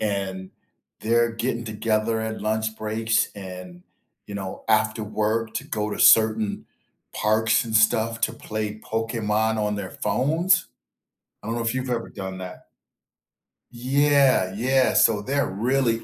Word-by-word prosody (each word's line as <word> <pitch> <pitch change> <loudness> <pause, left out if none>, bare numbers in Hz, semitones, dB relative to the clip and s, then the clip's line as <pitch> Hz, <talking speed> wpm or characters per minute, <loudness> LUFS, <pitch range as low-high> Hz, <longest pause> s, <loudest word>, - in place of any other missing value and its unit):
and 95 -3 -3 0.5
they're 115 +1 +2
getting 115 +1 -3
together 110 +1 -1
at 110 0 -4
lunch 110 +1 -1
breaks 110 +1 0
and, 90 -2 -9 0.4
you 100 - -8
know, 95 -2 -6
after 110 0 +2
work 110 +1 -1
to - - -3
go 105 0 -3
to - - -5
certain 110 -1 +4 0.5
parks 110 +2 +2
and 110 - -6
stuff 110 +1 +2
to - - +1
play 110 0 -5
Pokemon 110 0 -1
on 105 -1 -1
their 100 -2 -5
phones. 165 +6 +1 0.8
I 105 - -8
don't 115 - -2
know 120 - -2
if 115 +1 -1
you've 130 0 -3
ever 115 -2 -2
done 95 -2 -7
that. 90 -1 -9 1.0
Yeah, 135 -4 +2
yeah, 130 +4 +2
so 110 -2 +4
they're 140 +6 0
really 115 +3 0
110 Hz, 140 wpm, -24 LUFS, 105-115 Hz, 1.0 s, certain